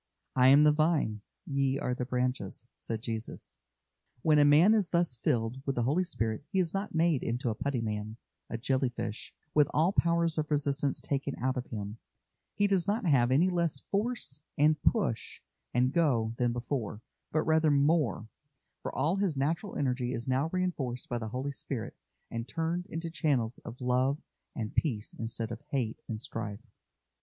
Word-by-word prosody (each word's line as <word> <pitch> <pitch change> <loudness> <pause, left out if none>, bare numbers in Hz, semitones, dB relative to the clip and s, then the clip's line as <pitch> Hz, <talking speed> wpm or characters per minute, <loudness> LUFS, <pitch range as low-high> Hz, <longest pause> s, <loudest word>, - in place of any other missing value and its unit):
"I 130 0 +6
am 140 +3 +8
the 150 - +7
Vine, 150 -9 +1 0.2
ye 140 -1 +1
are 125 - -1
the 125 0 -3
branches," 125 -5 -2
said 110 -1 -5
Jesus. 115 -2 -5 0.7
When 155 -2 +5
a - - +7
man 155 +9 +7
is 205 -6 +2
thus 170 -6 +2
filled 115 +2 0
with 135 - 0
the 120 - +1
Holy 150 +10 +2
Spirit 115 -8 -2
he 190 - -2
is 175 -4 +2
not 195 -2 -3
made 160 -4 +3
into 120 0 -1
a - - -1
putty 140 +1 -2
man, 105 0 -4 0.3
a 115 - -3
jelly 130 +2 +1
fish, 115 -2 -5 0.2
with 150 -2 +4
all 165 +6 +3
powers 170 -2 +2
of 150 - -2
resistance 145 -1 +1
taken 140 0 -2
out 130 +1 0
of 125 -1 -4
him; 105 0 -6 0.6
he 205 - +3
does 195 -2 +2
not 215 +2 0
have 130 -7 +4
any 160 +8 +4
less 170 -5 +1
force 205 - -1 0.2
and 150 +1 +4
"push" 195 - 0 0.3
and 125 +2 +2
"go" 120 -10 +2
than 120 -1 +2
before, 120 -3 -3 0.3
but 155 - +1
rather 160 0 +3
more, 145 - +2 0.5
for - - -4
all 170 +6 +1
his 190 -7 0
natural 165 +8 -1
energy 125 -2 0
is 120 0 -3
now 130 +4 +1
reinforced 155 -10 -2
by 120 - -1
the 110 -1 -4
Holy 130 +5 -3
Spirit, 130 -3 -4 0.4
and 115 +1 -4
turned 165 +3 -2
into 165 +1 -4
channels 135 -7 0
of 120 - -9
love 130 +2 +2 0.4
and 110 -2 -4
peace 115 -10 -1
instead 115 0 -3
of 115 - -6
hate 125 -7 -1
and 110 -2 -4
strife. 110 0 -5
135 Hz, 180 wpm, -30 LUFS, 120-160 Hz, 0.7 s, am